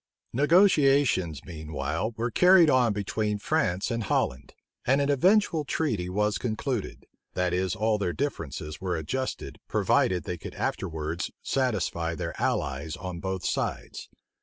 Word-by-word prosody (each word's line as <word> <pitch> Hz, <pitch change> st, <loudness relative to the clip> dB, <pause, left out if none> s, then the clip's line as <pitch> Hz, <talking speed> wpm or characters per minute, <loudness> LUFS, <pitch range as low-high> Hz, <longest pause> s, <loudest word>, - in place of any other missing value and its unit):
Negotiations 140 Hz, -, +3 dB
meanwhile 80 Hz, +5 st, -4 dB
were 115 Hz, +1 st, -1 dB
carried 180 Hz, -1 st, +6 dB
on 125 Hz, -3 st, +4 dB
between 105 Hz, +1 st, -1 dB
France 100 Hz, -, 0 dB
and 115 Hz, -2 st, -2 dB
Holland, 65 Hz, -6 st, -1 dB, 0.3 s
and 135 Hz, +3 st, +3 dB
an 140 Hz, 0 st, +2 dB
eventual 175 Hz, +2 st, +3 dB
treaty 115 Hz, -, -1 dB
was 105 Hz, +1 st, 0 dB
concluded; 120 Hz, -1 st, -3 dB, 0.3 s
that 90 Hz, -1 st, 0 dB
is 95 Hz, +2 st, 0 dB
all 110 Hz, 0 st, +1 dB
their 95 Hz, -3 st, 0 dB
differences 75 Hz, -, -4 dB
were 90 Hz, -3 st, -1 dB
adjusted, 130 Hz, -, -4 dB
provided 90 Hz, -1 st, +2 dB
they 90 Hz, -1 st, -5 dB
could -, -, -8 dB
after -, -, -2 dB
wards 80 Hz, +2 st, -3 dB
satisfy 95 Hz, -10 st, -1 dB
their -, -, -4 dB
allies 70 Hz, +3 st, -1 dB
on 90 Hz, -2 st, -6 dB
both 95 Hz, -1 st, -4 dB
sides. -, -, -3 dB
105 Hz, 135 wpm, -27 LUFS, 85-130 Hz, 0.3 s, carried